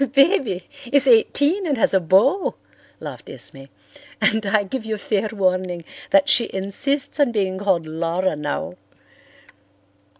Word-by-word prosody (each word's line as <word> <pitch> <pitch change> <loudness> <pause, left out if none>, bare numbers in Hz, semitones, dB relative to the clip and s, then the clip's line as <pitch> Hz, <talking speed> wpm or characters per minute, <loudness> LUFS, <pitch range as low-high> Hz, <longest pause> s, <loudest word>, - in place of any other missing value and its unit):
"'Baby' 275 - +2 0.3
is 280 -1 +4
eighteen 285 - +3
and 285 -4 0
has 225 - +2
a 190 - +4
beau," 200 - +2 0.4
laughed - - -9
Esme. 135 0 -7 0.5
"And 220 0 +2
I 205 +1 +2
give 230 +5 -5
you 220 -1 -3
fair 210 0 -1
warning 185 -4 -1 0.3
that 290 -1 +4
she 235 -6 +4
insists 270 +11 -2
on 280 -4 +3
being 190 -4 -1
called 190 -5 0
Laura 165 +3 -1
now. 145 -1 -4
210 Hz, 135 wpm, -21 LUFS, 185-275 Hz, 0.5 s, is